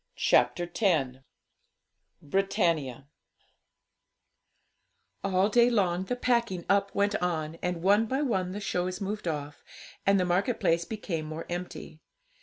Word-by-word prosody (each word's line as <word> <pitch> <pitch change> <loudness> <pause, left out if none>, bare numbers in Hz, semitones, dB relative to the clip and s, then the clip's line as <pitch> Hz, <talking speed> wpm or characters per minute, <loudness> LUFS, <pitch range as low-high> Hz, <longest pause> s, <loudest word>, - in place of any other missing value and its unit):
CHAPTER 125 +8 +2 0.2
X 135 -10 +2 1.1
BRITANNIA 165 - 0 2.2
All 190 0 +2
day 235 +3 +4
long 190 -5 +1
the 250 - -2
packing 235 -8 0
up 200 0 +1
went 200 +1 +2
on, 165 -3 -2
and 180 -1 -2
one 205 +4 +4
by 265 +5 0
one 190 -9 0
the 200 - -5
shows 185 -2 -2
moved 205 -1 -4
off, 145 -2 -4 0.4
and 195 0 +4
the 180 - +2
market 190 +7 0
place 170 +1 +2
became 195 -8 -4
more 155 +1 -6
empty. 175 -2 -6
185 Hz, 125 wpm, -28 LUFS, 165-205 Hz, 2.2 s, day